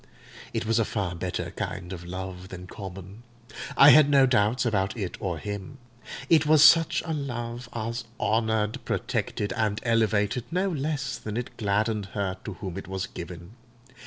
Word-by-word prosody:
It - - -2
was 115 +1 +2
a - - +4
far 100 -4 -2
better 90 +1 -4
kind 90 0 -5
of 85 -2 -7
love 90 +1 -6
than 90 -1 -8
common; 95 +1 -9 0.6
I 140 +2 +10
had 150 -2 +7
no 140 -2 +6
doubts 120 -1 +2
about 100 -1 0
it 95 -5 -3
or 90 -4 -2
him: 100 - -6 0.5
it 155 -1 +4
was 155 -1 +6
such 165 0 +6
a 165 - -2
love 120 -4 -4
as 115 +1 -4
honoured, 110 -1 0
protected, 105 - -2
and 105 -1 0
elevated, 110 0 +1
no 185 +3 0
less 135 -5 -2
than 110 -1 -5
it 120 0 -5
gladdened 105 -1 0
her 95 -2 -1
to 105 - -4
whom 95 0 -6
it - - -10
was 95 0 -3
given. 85 0 -9
110 Hz, 165 wpm, -27 LUFS, 95-125 Hz, 0.6 s, I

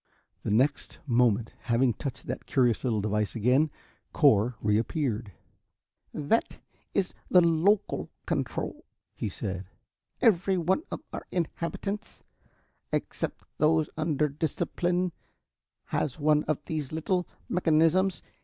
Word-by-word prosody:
The - - -3
next 130 +8 +1
moment, 120 -4 +2
having 120 +1 +3
touched 135 +5 -6
that - - -5
curious 120 -5 +2
little 115 -5 +1
device 105 +1 -1
again, 125 +7 +3 0.4
Cor 115 +5 +4
reappeared. 110 +1 0 0.8
"That 155 +10 0 0.4
is 195 -2 +1 0.2
the 180 - +7
local 170 +5 +2 0.2
control," - - -2 0.3
he - - -3
said. 95 -1 -5 0.5
"Every 195 -2 +3
one 180 - +2
of - - -5
our - - -6
inhabitants, 185 +5 -3 0.7
except - - -3
those 155 0 +3
under 155 -2 +1
discipline, 175 +4 -1 0.7
has 145 +1 -2
one 150 0 +3
of 150 -1 -1
these 150 -4 -3
little 175 +3 0 0.2
mechanisms. 170 +1 +3
150 Hz, 110 wpm, -28 LUFS, 120-170 Hz, 0.8 s, the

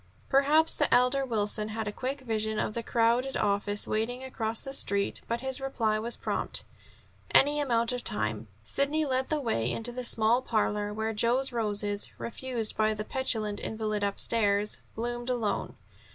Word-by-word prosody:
Perhaps 295 +4 +4
the 295 - +2
elder 250 +2 +4
Wilson 215 -3 0
had 220 0 -4
a - - -1
quick 265 +5 -4
vision 220 -3 -1
of 215 - -1
the 235 - -2
crowded 235 +3 +1
office 205 0 0
waiting 240 +4 -1
across 225 -4 -3
the 270 - -5
Street; 200 -6 +1
but 235 +1 -2
his 265 0 -2
reply 225 -5 0
was 235 +2 -2
prompt: - - -1 0.7
"Any 290 +2 +6
amount 235 -4 +1
of 245 - -3
time." 110 +1 -1 0.2
Sidney 285 - +1
led 260 -1 0
the 310 - +1
way 125 - 0
into 230 +1 -2
the 250 +1 -5
small 235 +1 +3
parlor, 210 -3 0
where 220 +1 -2
Joe's 245 +5 +1
roses, 205 -3 -1
refused 235 -2 -3
by 215 0 +2
the 210 0 -4
petulant 220 -6 -1
invalid 215 -2 -2
upstairs, 205 0 +1 0.2
bloomed 240 +2 -3
alone. 225 -5 -1
230 Hz, 165 wpm, -29 LUFS, 210-255 Hz, 0.7 s, Any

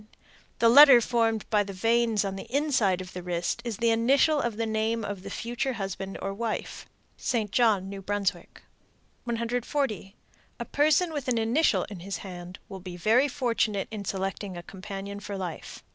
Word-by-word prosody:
The 230 - +4
letter 270 +1 +9
formed 225 -2 0
by 210 -1 +4
the 200 0 -7
veins 225 +1 +2
on 195 -1 -3
the 195 - -9
inside 250 -10 +1
of 185 0 -9
the 180 - -6
wrist 175 +5 -2
is 235 -4 -4
the 230 0 +2
initial 275 +6 +3
of 235 -3 -2
the 230 - 0
name 220 0 -1
of 200 -2 -5
the - - -8
future 240 +3 -3
husband 195 -2 -5
or 195 - -2
wife. 225 +2 -4 0.3
St. 220 -5 -1
John, 205 -5 +2
N.B. 195 0 -7 1.1
140. 235 -2 -2 0.4
A - - -3
person 310 +4 +2
with 285 -4 -4
an 245 -2 +1
initial 230 +8 +2
in 200 -4 -8
his 190 +1 -5
hand 180 -1 -8
will 195 -2 -8
be 180 -1 -8
very 230 +9 +3
fortunate 230 -7 -1
in 210 -2 -5
selecting 195 0 -4
a 175 - -7
companion 195 +1 -7
for 205 -1 -6
life. 180 -4 -6
220 Hz, 175 wpm, -27 LUFS, 195-235 Hz, 1.1 s, letter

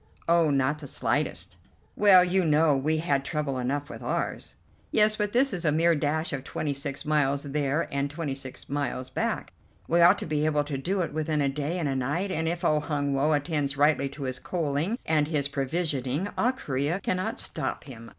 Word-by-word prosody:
"Oh, 165 -1 +4
not 140 +1 +1
the 145 - -8
slightest." - - -1 0.4
"Well, 195 -3 +7
you 185 +1 +2
know, 155 -1 +4
we 155 +4 +1
had 145 -4 0
trouble 140 -3 -2
enough 140 +3 -2
with - - -9
ours." - - -2 0.3
"Yes, 215 0 +4
but 210 -1 0
this 255 +1 +3
is 180 - -2
a 155 - +3
mere 165 +3 +3
dash 155 +1 0
of 135 -2 -3
twenty 145 +1 -3
six 140 0 -4
miles 145 -2 +1
there 145 +2 -1
and 140 0 0
twenty 145 -1 -3
six 135 -1 -6
miles 130 -2 -3
back. - - -2 0.3
We 170 +1 +3
ought 175 +4 +7
to - - -4
be 150 -1 -1
able 150 -1 +2
to 145 -2 -4
do 185 +7 -1
it 165 - -3
within 155 0 -1
a 140 -1 +2
day 150 +5 -2
and 165 -4 -1
a 135 - -1
night, 145 +10 -1
and 160 -3 -1
if 170 +1 -2
old 150 -2 +2
Hun 145 -2 -1
Woe 145 +3 +2
attends 145 -2 -1
rightly 145 -1 +3
to 140 +1 -8
his 130 -1 -2
coaling 165 - -1
and 155 -2 +2
his 150 -3 +1
provisioning, 140 +2 -1
all 250 +2 +2
Corea 145 - -2
cannot 195 +5 -2
stop 150 -4 -3
him. 115 -4 -11
150 Hz, 205 wpm, -27 LUFS, 140-170 Hz, 0.4 s, Well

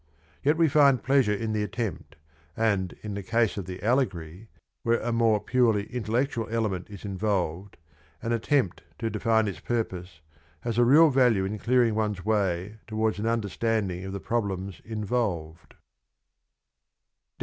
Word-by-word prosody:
Yet 150 +3 +2
we 165 -1 +4
find 140 -3 +4
pleasure 135 -4 +3
in 110 +1 -3
the 105 - 0
attempt, 105 0 -4 0.4
and 100 -5 +1
in 105 -1 -4
the 100 - -4
case 115 +3 +1
of 100 -4 -4
the 95 +1 -8
allegory, 100 - -1 0.3
where 115 0 +2
a 120 - -2
more 115 -2 +3
purely 110 -1 +2
intellectual 120 0 -1
element 110 -5 -2
is 100 0 -10
involved, 95 -2 -2 0.5
an 115 - -1
attempt 115 - +1 0.2
to 115 -1 -2
define 110 -2 +2
its 95 - -4
purpose 90 -8 -4 0.4
has 115 0 -2
a 120 - +6
real 150 +5 +7
value 120 -7 +3
in 105 +2 -4
clearing 120 -1 +3
one's 105 -4 -2
way 100 -1 0
towards 110 -1 -1
an 110 - -1
understanding 110 -4 -1
of 95 - -5
the 100 - -4
problems 100 -5 -3
involved. 100 -8 -3
110 Hz, 150 wpm, -27 LUFS, 95-115 Hz, 0.5 s, real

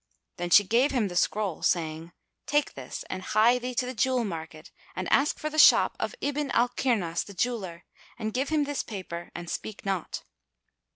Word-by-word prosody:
Then 175 0 -3
she 205 - +8
gave 235 +8 +3
him 235 -8 0
the 175 - -7
scroll, 200 -1 0
saying, 165 -1 -1 0.4
"Take 295 +1 +1
this - - -7
and 185 - -5
hie 230 +6 +3
thee 250 0 -5
to 255 - +1
the 255 - -4
jewel 255 0 +1
market 160 -4 -7 0.2
and 185 0 -3
ask 285 +2 +3
for 305 - -4
the 310 - -1
shop - - +7
of - - -3
Ibn 290 0 -1
al 240 +1 +4
Kirnas 195 -12 0
the 200 - -12
Jeweller 185 -5 -3 0.3
and 220 -2 -3
give 265 +2 -1
him 310 -2 +2
this 290 0 -2
paper 180 -5 -7
and 175 0 -6
speak 215 +5 -6
not." 190 -4 -3
215 Hz, 190 wpm, -27 LUFS, 175-255 Hz, 0.4 s, she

